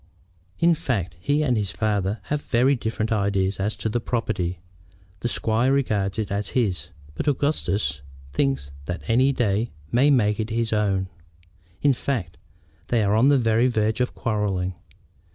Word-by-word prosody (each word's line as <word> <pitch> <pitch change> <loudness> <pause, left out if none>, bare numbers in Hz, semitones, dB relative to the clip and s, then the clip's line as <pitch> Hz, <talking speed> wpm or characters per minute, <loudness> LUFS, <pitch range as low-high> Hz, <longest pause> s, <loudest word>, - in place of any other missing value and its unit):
In 170 0 +4
fact, 110 - -2
he 145 - +1
and 130 -4 +2
his 105 -4 0
father 105 -1 -1
have 150 0 -2
very 130 +2 +3
different 110 -2 -2
ideas 100 -2 +1
as 105 +3 -1
to - - -3
the 115 +2 0
property. 110 -7 -1 0.6
The - - -1
squire 115 +2 +1
regards 105 -8 0
it 110 -3 -2
as 100 0 -1
his, 95 - 0 0.3
but 80 - -4
Augustus 105 - 0 0.3
thinks 70 0 0
that 90 +2 -5
any 130 +4 +4
day 115 -3 0 0.2
may 135 +5 +4
make 105 -6 +3
it 110 0 -2
his 115 0 -1
own. 100 -3 +1 0.8
In 145 -1 +5
fact, 115 -10 -3 0.5
they 115 -3 +2
are 100 0 +2
on 120 +5 +5
the 145 - +5
very 115 0 +3
verge 110 -1 +1
of 125 - -1
quarrelling." 100 -4 -1
110 Hz, 160 wpm, -24 LUFS, 100-125 Hz, 0.8 s, In